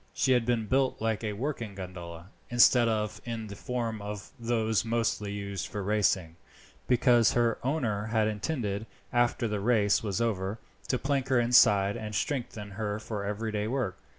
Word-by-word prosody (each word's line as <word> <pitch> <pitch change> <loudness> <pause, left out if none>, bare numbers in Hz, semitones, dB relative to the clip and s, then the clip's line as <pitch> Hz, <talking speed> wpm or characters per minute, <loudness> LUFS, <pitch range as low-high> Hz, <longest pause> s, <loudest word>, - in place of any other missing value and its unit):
She 130 - +2
had 120 -2 +3
been 120 -3 +1
built 130 +3 +1
like 110 0 -1
a 105 -1 -2
working 115 -3 -4
gondola, 90 -2 -8 0.2
instead 120 0 +5
of 105 -1 -1
in 115 -2 -4
the 100 -1 -8
form 115 -1 -3
of 105 0 -7
those 115 -2 +1
mostly 115 -3 -1
used 100 -2 -4
for 100 -1 -5
racing, 95 -5 +1 0.5
because 120 -2 +4
her 120 -2 +2
owner 120 -7 -1
had 110 -1 +2
intended, 110 -2 -2 0.3
after 120 0 +2
the 105 -1 -2
race 105 -2 +3
was 105 -2 -2
over, 105 -3 -1 0.3
to 130 - +1
plank 135 0 -1
her 130 -2 +3
inside 105 -4 +5
and 110 -2 -5
strengthen 110 -5 -3
her 105 0 -3
for 110 -2 -5
everyday 105 +1 -2
work. 120 -6 -2
110 Hz, 165 wpm, -29 LUFS, 100-120 Hz, 0.5 s, instead